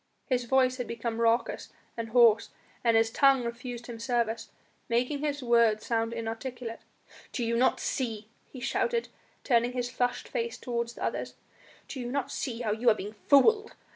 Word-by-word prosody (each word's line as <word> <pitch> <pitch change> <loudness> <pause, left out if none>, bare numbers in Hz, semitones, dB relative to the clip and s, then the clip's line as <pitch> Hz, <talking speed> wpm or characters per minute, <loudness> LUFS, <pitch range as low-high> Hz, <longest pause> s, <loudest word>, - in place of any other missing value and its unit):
His 250 -3 0
voice 255 0 +3
had 245 - -4
become 230 0 -3
raucous 230 +1 +1 0.3
and 230 -1 -4
hoarse 230 -2 +5 0.3
and 230 -2 +4
his 225 0 +3
tongue 270 0 +4
refused 235 0 -6
him 235 -2 -8
service, 230 -2 -1 0.4
making 250 +5 +1
his 290 -2 -2
words 235 -3 +3
sound 225 -1 0
inarticulate. 230 +1 -5 0.5
"Do 240 - -2
ye 230 - 0
not 245 +2 +3
see," 225 -5 -3 0.2
he 260 - -9
shouted, 465 - 0 0.3
turning 240 -1 +2
his 245 -1 -2
flushed 245 -1 -1
face 465 -1 -3
toward 235 -2 -2
the 235 - -8
others, - - -3 0.5
"do 270 - -6
you 240 -1 -4
not 280 -1 -2
see 240 -2 -3
how 220 -3 0
you 230 +3 +3
are 220 - +5
being 210 +1 -6
fooled? 420 +10 +5
240 Hz, 170 wpm, -29 LUFS, 230-255 Hz, 0.5 s, hoarse